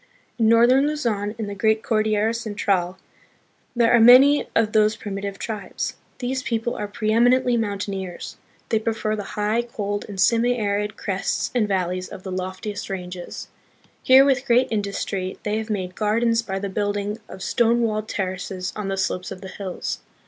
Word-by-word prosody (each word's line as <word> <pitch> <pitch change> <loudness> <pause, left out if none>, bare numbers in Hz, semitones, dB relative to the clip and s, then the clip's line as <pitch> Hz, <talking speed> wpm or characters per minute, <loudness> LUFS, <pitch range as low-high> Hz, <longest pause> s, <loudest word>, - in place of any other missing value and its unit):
In 220 -1 +4
northern 245 +5 +5
Luzon, 225 -9 -2
in 220 - -3
the 205 - -5
great 220 +2 +1
Cordillera 215 0 +1
Central, 200 -5 -1 0.8
there 235 -1 +4
are 240 - +6
many 260 +5 +7
of 220 -1 +3
these 215 0 +4
primi 200 -2 -6
tive 200 -1 -5
tribes. 210 -4 -4 0.2
These 255 +1 -2
people 235 -1 -2
are 210 - -4
preeminently 240 +4 +2
mountaineers. 200 -4 -4 0.3
They 220 - +2
prefer 220 -1 -1
the 210 - -4 0.2
high, 210 +3 +1
cold, 205 -4 -4
and 195 -2 -7
semi 235 +4 +3
arid 210 -1 -1
crests 195 -1 -2
and 235 -4 +2
val 185 -3 0
leys 185 0 -4
of 185 - -10
the 190 - -6
loftiest 185 +3 -5
ranges. 180 -2 -6 0.5
Here, 265 +1 +7
with 270 -1 +1
great 250 +2 +4
industry, 200 -3 -2
they 210 +1 -1
have 220 0 -6
made 185 -4 -3
gardens 230 +3 +1
by 195 -4 -4
the 200 +1 -3
building 205 +2 -2
of 190 - -8
stone 235 0 +2
walled 215 -1 -1
ter 190 -2 -1
races 185 0 -5
on 210 -2 -4
the 195 0 -2
slopes 185 -1 -2
of 185 - -8
the 190 - -8
hills. 190 -2 -5
210 Hz, 175 wpm, -23 LUFS, 195-230 Hz, 0.8 s, many